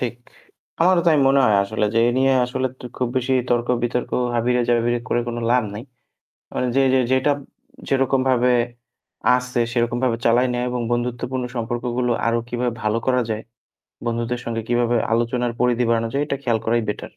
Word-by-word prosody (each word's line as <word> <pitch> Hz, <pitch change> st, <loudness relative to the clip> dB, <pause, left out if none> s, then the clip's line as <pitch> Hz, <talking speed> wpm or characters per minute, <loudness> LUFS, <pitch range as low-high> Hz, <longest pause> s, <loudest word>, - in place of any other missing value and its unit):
ঠিক। 120 Hz, -2 st, -2 dB, 0.7 s
আমারও 175 Hz, 0 st, +4 dB
তাই 160 Hz, -2 st, +5 dB
মনে 135 Hz, +1 st, +4 dB
হয় 105 Hz, -4 st, +4 dB
আসলে 105 Hz, +1 st, -2 dB
যে, 115 Hz, -, +3 dB
এ -, -, +3 dB
নিয়ে 135 Hz, 0 st, +3 dB
আসলে 130 Hz, +1 st, -2 dB
টু -, -, -11 dB
খুব 125 Hz, -, -1 dB
বেশি 130 Hz, +1 st, 0 dB, 0.2 s
তর্ক 120 Hz, 0 st, +1 dB
বিতর্ক, 120 Hz, 0 st, -1 dB, 0.2 s
হাবিয়ে, 125 Hz, +1 st, +1 dB
জাবিয়ে 120 Hz, 0 st, +2 dB
করে 120 Hz, -, +1 dB
কোন 120 Hz, -, -4 dB
লাভ 125 Hz, 0 st, +4 dB
নাই। 105 Hz, -, -6 dB, 0.7 s
আ -, -, -2 dB, 0.2 s
যে 135 Hz, -, +4 dB
যে 130 Hz, -, +4 dB
যেটা 130 Hz, +2 st, +3 dB, 0.6 s
যেরকমভাবে 130 Hz, -2 st, +2 dB, 0.9 s
আছে 125 Hz, -1 st, -2 dB
সেরকমভাবে 120 Hz, 0 st, 0 dB
চালাই 120 Hz, +2 st, +4 dB
নেওয়া 120 Hz, 0 st, -1 dB
এবং 125 Hz, -1 st, -2 dB
বন্ধুত্বপূর্ণ 125 Hz, +1 st, -2 dB
সম্পর্কগুলো 120 Hz, +1 st, -2 dB, 0.2 s
আরও 115 Hz, 0 st, +2 dB
কিভাবে 120 Hz, -1 st, -1 dB
ভালো 110 Hz, +1 st, +1 dB
করা 125 Hz, -1 st, +2 dB
যায়, 110 Hz, 0 st, -2 dB, 0.6 s
বন্ধুদের 120 Hz, +1 st, -2 dB
সঙ্গে 115 Hz, -1 st, -2 dB
কিভাবে 120 Hz, 0 st, +2 dB, 0.2 s
আলোচনার 120 Hz, +1 st, 0 dB
পরিধি 125 Hz, 0 st, +2 dB
বাড়ানো 115 Hz, 0 st, +1 dB
যায় 140 Hz, -, 0 dB
এটা 140 Hz, -2 st, -2 dB
খেয়াল 115 Hz, -4 st, +1 dB
করাই 115 Hz, +1 st, +2 dB
better। 105 Hz, -, -4 dB
120 Hz, 170 wpm, -21 LUFS, 120-125 Hz, 0.9 s, তাই